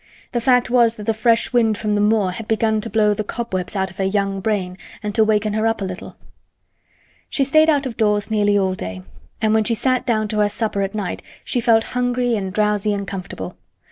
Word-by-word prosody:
The 240 - -1
fact 250 0 +3
was 235 -2 +4
that 210 - -8
the 225 - +1
fresh 230 +2 +1
wind 225 -3 +3
from 210 -1 -1
the 205 - +1
moor 210 -3 +2
had 215 +4 -7
begun 220 0 +1
to - - -6
blow 210 0 +3
the 215 - -3
cobwebs 205 -4 -4
out 190 -1 -1
of 185 - -19
her 195 - -1
young 195 0 0
brain 190 -3 -2 0.2
and 210 -1 -3
to 220 - +4
waken 215 -1 +1
her 215 +1 +1
up 225 0 0
a 195 - -2
little. 185 -1 -7 1.1
She 275 - +1
stayed 310 +4 +4
out 290 -3 +2
of 240 -4 -5
doors 210 -1 +1
nearly 205 -1 +3
all 190 -2 +1
day, 95 - -6 0.4
and 215 0 +3
when 220 0 +3
she 230 +2 0
sat 255 +2 +1
down 215 -3 +1
to 215 - -1
her 205 0 +3
supper 210 -2 -2
at 195 +1 -2
night 200 -4 -3 0.2
she 245 - -1
felt 225 -1 +4
hungry 245 -1 +1
and 190 -3 -3
drowsy 210 0 +1
and 200 -1 -4
comfortable. 180 - -6
215 Hz, 230 wpm, -20 LUFS, 200-230 Hz, 1.1 s, was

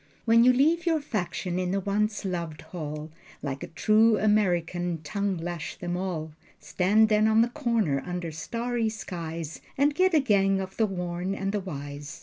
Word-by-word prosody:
When 230 0 +6
you 250 - +7
leave 320 +7 +2
your 325 -2 +3
faction 180 - -3
in 180 -1 -1
the 195 +2 0
once 210 +2 -1
loved 170 -4 -3
hall, 155 -2 -6 0.3
Like 140 -2 -3
a - - -5
true 215 +5 +4
American 175 -5 +1
tongue 200 +3 -1
lash 170 -1 -5
them 175 0 -3
all, 175 -4 -3 0.3
Stand 190 +8 +3
then 215 0 +3
on 220 +1 +5
the 240 - -1
corner 230 - 0
under 180 -2 -4
starry 230 +7 -2
skies 165 -7 -6 0.2
And 285 +2 +3
get 370 +4 +3
you - - +6
a - - +4
gang 195 -5 +3
of 190 0 -5
the 220 - +3
worn 180 0 -3
and 195 0 -2
the 210 - -1
wise. 145 -5 -7
190 Hz, 180 wpm, -27 LUFS, 170-220 Hz, 0.3 s, you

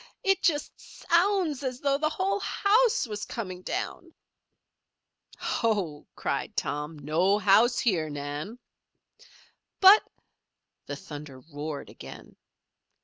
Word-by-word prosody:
"It 390 -2 +2
just 315 -5 +1
so - - -15
o 385 +4 +4
ounds 300 -6 -3
as 255 -2 -3
though 280 -1 +1
the 305 0 +1
whole 385 +5 -1
house 430 +4 +2
was 210 -3 -5
coming 185 -6 -6
down." - - -5 1.2
"Ho!" 195 -10 -1
cried - - -3
Tom. 150 +2 -3
"No 165 +8 +2
house 215 +4 +4
here, 175 -10 +1
Nan." 145 +9 -5 1.2
"But 400 +2 +9 0.4
" - - -58
The 145 - -4
thunder 145 -2 -9
roared 145 +1 -7
again. - - -12
210 Hz, 120 wpm, -27 LUFS, -, 1.2 s, But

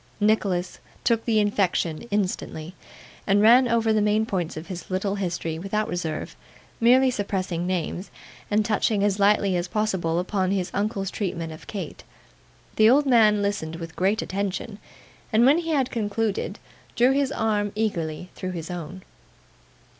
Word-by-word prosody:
Nicholas 200 -4 +1 0.2
took 230 -1 +1
the 225 -2 +3
infection 185 -5 0
instantly, 185 -4 -2 0.5
and 200 0 +4
ran 240 +4 +6
over 230 -1 +2
the 215 - +2
main 210 +1 +2
points 180 -8 -3
of 155 - -6
his 180 -2 -8
little 190 +1 -1
history 175 -4 -3
without 210 +4 -1
reserve: 170 -6 -4 0.4
merely 255 +3 +5
suppressing 185 -5 -2
names, 185 +1 -3 0.4
and 210 0 +2
touching 210 -1 +1
as 205 -1 +1
lightly 200 -1 +3
as 175 +1 -1
possible 190 -5 -1
upon 185 +1 0
his 190 -2 -1
uncle's 200 -2 -1
treatment 170 -5 -3
of 155 - -13
Kate. 200 -3 -6 0.7
The 215 0 +6
old 285 +4 +5
man 215 -5 +4
listened 185 -6 -2
with 165 0 -8
great 200 +4 +1
attention, 200 +1 -4 0.5
and 225 +1 +4
when 285 +5 +5
he 330 -1 -4
had 275 -5 +1
concluded, 210 -2 -2 0.4
drew 245 +3 +4
his 275 0 +1
arm 210 -4 0
eagerly 180 -6 -2
through 185 0 -5
his 165 0 -6
own. 180 +2 -7
200 Hz, 155 wpm, -25 LUFS, 180-220 Hz, 0.7 s, ran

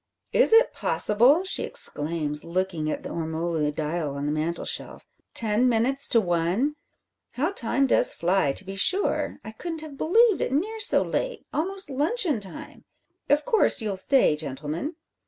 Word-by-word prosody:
Is - - +4
it 455 +2 +5
possible?" 245 - +3
she 380 - 0
exclaims, 150 -1 0
looking 170 -2 -2
at - - -4
the - - -6
ormolu 160 -1 -2
dial 150 -1 -3
on 140 0 -4
the 150 - -1
mantelshelf. 160 +3 -3 0.3
"Ten 225 +3 +2
minutes 250 +4 +1
to 230 - +4
one! 180 - 0 0.6
How 300 +8 -1
time 270 - 0
does - - +4
fly, 180 - +1
to 190 - -3
be 195 +1 -7
sure! 375 - +1
I 220 - -7
couldn't 325 +8 -6
have 305 -3 -10
believed 440 +4 +3
it - - -1
near 425 +10 -1
so 425 - +3
late - - -3
almost 380 +1 -2
luncheon 300 - +1
time! 195 -3 -10 0.5
Of 295 +1 +2
course 450 - +3
you'll 210 -4 -2
stay, 190 - +2
gentlemen? 150 - -5
220 Hz, 155 wpm, -25 LUFS, -, 0.6 s, it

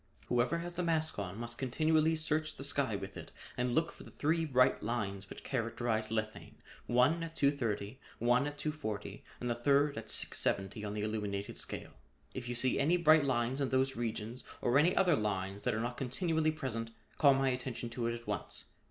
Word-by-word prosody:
Whoever 125 +7 +2
has 175 +1 -5
the - - +1
mask 160 -6 0
on 100 0 -4
must 120 0 -5
continually 155 +4 +2
search 155 0 0
the - - -7
sky 140 -5 +1
with 100 0 -6
it - - -9 0.2
and 125 0 0
look 165 +1 +2
for - - -15
the - - -12
three 160 +2 0
bright 130 -4 +3
lines 100 -4 -3
which - - -9
characterize 115 -3 -1
lethane, 110 -1 -3 0.3
one 130 +8 +4
at 165 0 -5
230, 120 -5 0 0.2
one 120 +4 +3
at 145 0 -6
240 145 -9 -4 0.2
and 125 - -3
the 120 - +2
third 140 +2 +2
at 110 -1 -10
670 100 0 0
on 105 0 -4
the 105 - -2
illuminated 105 -2 -3
scale. - - -4 0.4
If 125 -1 -5
you 120 - -2
see 130 +1 +2
any 160 +6 +4
bright 155 -3 +6
lines 130 +1 0
in 135 - +1
those 130 +1 +1
regions 115 +1 -3 0.2
or 125 +3 +3
any 170 +5 +4
other 175 -4 +5
lines 100 -3 -2
that - - +2
are - - -1
not 120 +2 -3
continually 160 +4 0
present, 120 -7 -4 0.3
call 140 -3 +7
my 135 0 +2
attention 125 -2 -3
to 120 0 -2
it 115 - -1
at 120 0 -10
once. 105 -3 -3
125 Hz, 195 wpm, -33 LUFS, 110-145 Hz, 0.4 s, call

